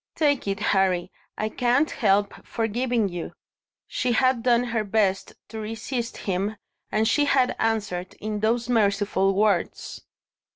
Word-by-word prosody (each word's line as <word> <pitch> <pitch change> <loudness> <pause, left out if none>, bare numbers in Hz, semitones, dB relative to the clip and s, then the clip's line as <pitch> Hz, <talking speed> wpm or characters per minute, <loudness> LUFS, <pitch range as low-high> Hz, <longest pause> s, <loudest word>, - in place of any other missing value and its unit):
"Take 285 -7 +1
it, 195 0 -1
Harry; 190 -3 +1 0.3
I 215 - -1
can't 250 +7 +1
help 205 -3 +2
forgiving 230 0 0
you!" 175 -3 -6 0.5
She 250 -1 -1
had 255 0 +3
done 240 0 +3
her 230 -3 -1
best 200 -2 0
to 220 0 -6
resist 225 +3 -4
him, 195 +2 -1 0.4
and 220 +1 +2
she 290 +6 +3
had 265 -3 +2
answered 205 -5 -1
in 215 0 -4
those 230 +3 +1
merciful 200 -4 +2
words. 200 -3 0
220 Hz, 135 wpm, -25 LUFS, 200-240 Hz, 0.5 s, had